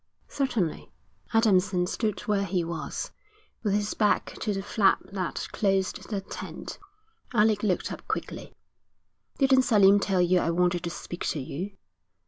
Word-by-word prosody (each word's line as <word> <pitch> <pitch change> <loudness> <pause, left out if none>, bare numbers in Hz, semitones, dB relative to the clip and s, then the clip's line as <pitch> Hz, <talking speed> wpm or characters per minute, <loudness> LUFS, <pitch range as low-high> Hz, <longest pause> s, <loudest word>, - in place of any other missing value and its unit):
'Certainly.' 235 - -2 0.4
Adamson 195 -5 +3
stood 215 +2 -2
where 205 -2 0
he 180 -2 0
was, 165 -2 -4 0.5
with 205 -3 +1
his 205 0 0
back 210 -2 +1
to 215 - -1
the 195 -1 -2
flap 200 -1 +3 0.2
that 185 -3 -3
closed 195 -3 0
the 205 -3 -2
tent. - - -8 0.6
Alec 210 -1 +4
looked 195 -4 0
up - - -8
quickly. - - -5 0.8
'Didn't 265 -1 +5
Selim 205 -5 +5
tell 195 -2 0
you 180 +1 +4
I 170 - 0
wanted 175 0 +1
to - - -1
speak 175 +1 -6
to 155 - -1
you?' 175 +9 -5
195 Hz, 145 wpm, -27 LUFS, 180-210 Hz, 0.8 s, Didn't